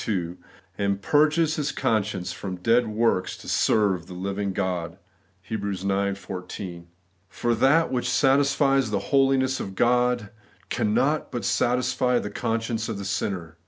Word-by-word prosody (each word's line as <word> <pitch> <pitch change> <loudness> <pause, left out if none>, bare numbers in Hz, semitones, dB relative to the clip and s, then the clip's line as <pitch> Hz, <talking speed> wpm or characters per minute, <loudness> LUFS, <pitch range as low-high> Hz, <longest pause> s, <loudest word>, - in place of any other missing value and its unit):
2), 90 -5 -2 0.4
and 100 -1 0
'purges 155 +2 +3
his 150 -1 -1
conscience 105 -7 -1
from 95 0 -5
dead 115 +6 +2
works 110 -4 0
to - - -13
serve 95 -5 +2
the 90 - -9
living 100 +2 -2
God' 90 -2 -3 0.5
(Heb. 110 -2 -4
ix. 100 0 -1
14). 90 -2 -7 0.4
For 120 +5 -1
that 135 +8 +3
which 125 -1 -1
satisfies 135 +1 +3
the - - 0 0.2
holiness 135 -1 +3
of 95 -1 -6
God 125 -2 +2 0.4
cannot 140 +8 +1
but 120 - -4
satisfy 125 0 +1
the 105 - -3
conscience 115 +1 -2
of 110 - -3
the 100 - -6
sinner. 85 -5 -3
110 Hz, 140 wpm, -25 LUFS, 95-130 Hz, 0.5 s, purges